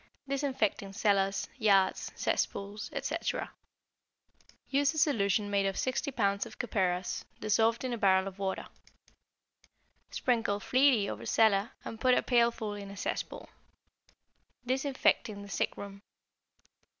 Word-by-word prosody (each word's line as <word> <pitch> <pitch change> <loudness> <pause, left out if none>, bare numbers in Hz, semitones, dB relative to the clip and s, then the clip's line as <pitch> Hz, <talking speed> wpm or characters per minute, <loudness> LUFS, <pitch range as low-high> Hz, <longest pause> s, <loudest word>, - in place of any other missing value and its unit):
=Disinfecting 260 -8 -1
Cellars, 195 -2 +1
Yards, 195 -5 +3
Cesspools, 205 +2 -2
etc.= - - -3 1.2
Use 285 +3 +2
a - - -5
solution 210 - +2
made 200 -1 +2
of 195 - -2
60 260 +3 -1
pounds 200 -4 +1
of - - -13
copperas 185 -6 -1 0.2
dissolved 225 +3 +2
in 255 -1 -2
a 235 - -4
barrel 190 -1 +4
of 195 0 -8
water. 190 -1 -2 1.4
Sprinkle 225 -5 0
freely 255 -3 +3
over - - -6
cellar 215 -1 +3
and 225 - -7
put 255 -1 +4
a - - +1
pailful 235 -3 +2
in 200 -1 -7
a 200 - -10
cesspool. - - -4 1.2
=Disinfecting 260 -5 0
the 200 - -11
Sick - - -1
Room. 200 0 -8
210 Hz, 125 wpm, -31 LUFS, 200-245 Hz, 1.4 s, barrel